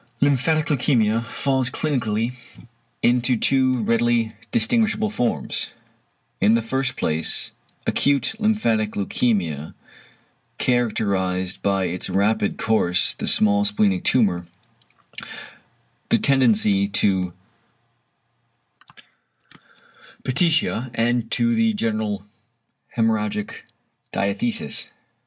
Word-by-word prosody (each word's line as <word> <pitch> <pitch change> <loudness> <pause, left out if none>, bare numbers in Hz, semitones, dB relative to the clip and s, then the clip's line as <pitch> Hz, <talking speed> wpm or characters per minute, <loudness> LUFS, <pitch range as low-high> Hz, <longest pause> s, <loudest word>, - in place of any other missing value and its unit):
~Lymphatic 145 +3 +2
leukæmia~ 115 -6 +1
falls 130 +1 0
clinically 120 -6 -1 0.7
into 120 +1 +3
two 130 -1 +2
readily 115 0 +1 0.2
distinguishable 220 -2 +1
forms. 125 - -2 0.7
In 110 +3 +4
the 115 - 0
first 130 +2 -1
place 80 +1 -1 0.3
acute 140 - +1
lymphatic 115 - +1
leukæmia, 95 - -1 0.8
characterised 95 -6 0
by 100 -1 +1
its 90 0 -3
rapid 100 +1 +1
course, 95 -5 +1
the - - -5
small 100 -1 +3
splenic 105 -2 +1
tumour, 90 -8 +1 1.6
the - - +4
tendency 110 -7 +3
to 95 -3 0 2.9
petechiæ 140 -3 +1
and 115 0 0
to 235 0 +2
the 225 -1 +2
general 110 - -2 0.7
hæmorrhagic 105 -2 0 0.6
diathesis. 215 - -1
115 Hz, 85 wpm, -22 LUFS, 100-135 Hz, 2.9 s, In